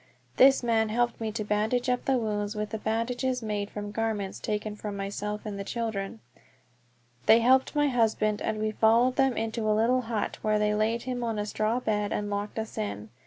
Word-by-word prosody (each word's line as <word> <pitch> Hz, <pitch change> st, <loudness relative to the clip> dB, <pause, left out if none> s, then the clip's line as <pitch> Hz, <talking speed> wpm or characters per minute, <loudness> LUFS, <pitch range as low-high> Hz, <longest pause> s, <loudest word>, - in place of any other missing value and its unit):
This 270 Hz, 0 st, +6 dB
man 225 Hz, -2 st, +2 dB
helped 240 Hz, +1 st, 0 dB
me 220 Hz, -1 st, -2 dB
to 220 Hz, -1 st, -2 dB
bandage 215 Hz, +4 st, 0 dB
up 250 Hz, 0 st, 0 dB
the 265 Hz, -1 st, +2 dB
wounds 210 Hz, -2 st, -2 dB
with 210 Hz, +1 st, -4 dB
bandages 245 Hz, +3 st, -1 dB
made 205 Hz, -2 st, -2 dB
from 205 Hz, 0 st, -6 dB
garments 215 Hz, -3 st, -2 dB
taken 210 Hz, 0 st, -3 dB
from 205 Hz, -1 st, -6 dB
myself 205 Hz, +1 st, -4 dB
and 205 Hz, -2 st, -5 dB
the -, -, -3 dB
children. 220 Hz, -1 st, -4 dB, 1.1 s
They 220 Hz, -, +8 dB
helped 260 Hz, +4 st, +3 dB
my 295 Hz, 0 st, +3 dB
husband, 220 Hz, -4 st, +1 dB
and 215 Hz, -, -1 dB
we 215 Hz, 0 st, -1 dB
followed 230 Hz, +4 st, +3 dB
them 270 Hz, -2 st, +2 dB
into 220 Hz, 0 st, -1 dB
a 210 Hz, -, +3 dB
little 245 Hz, +3 st, +3 dB
hut, 225 Hz, -3 st, -3 dB
where 215 Hz, 0 st, +2 dB
they 210 Hz, 0 st, +2 dB
laid 220 Hz, +2 st, 0 dB
him 250 Hz, -1 st, -3 dB
on 225 Hz, -2 st, -2 dB
a 210 Hz, -, -1 dB
straw 215 Hz, +3 st, 0 dB
bed 210 Hz, -3 st, -1 dB
and 205 Hz, 0 st, -2 dB
locked 205 Hz, +2 st, -3 dB
us 220 Hz, 0 st, -4 dB
in. 105 Hz, +1 st, -4 dB
220 Hz, 200 wpm, -28 LUFS, 210-235 Hz, 1.1 s, They